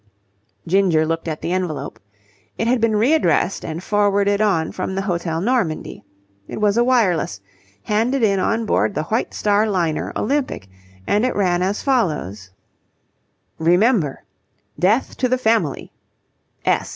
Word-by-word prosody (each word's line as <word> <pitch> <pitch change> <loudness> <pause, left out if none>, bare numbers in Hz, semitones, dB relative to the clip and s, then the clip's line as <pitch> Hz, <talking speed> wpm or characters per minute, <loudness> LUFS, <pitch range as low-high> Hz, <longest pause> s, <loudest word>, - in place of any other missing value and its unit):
Ginger 175 -3 +2
looked 165 +1 -3
at 155 -1 -4
the 170 - -2
envelope. 180 -5 -3 0.6
It - - -1
had 245 -1 +2
been 225 -1 +2
readdressed 240 - +2
and 165 +2 -5
forwarded 205 0 +2
on 175 -7 +1
from 190 0 -4
the 195 - -1
Hotel 170 -4 -2
Normandie. 200 -8 -1 0.4
It - - -6
was 210 -1 +2
a 235 - +4
wireless, 200 - +1 0.4
handed 230 +5 0
in 200 -3 +3
on 225 +4 0
board 205 - +1
the 155 - -1
White 220 +9 -1
Star 210 +1 +2
liner 170 -6 -1
Olympic, 270 - -2 0.4
and 210 +2 +1
it 255 - 0
ran 180 -3 +1
as 195 +3 -1
follows: 150 - -1 1.1
Remember. 175 - +2 0.6
Death 210 - +1
to 255 - 0
the 255 - +2
Family. 220 - 0
200 Hz, 140 wpm, -20 LUFS, 170-225 Hz, 1.1 s, a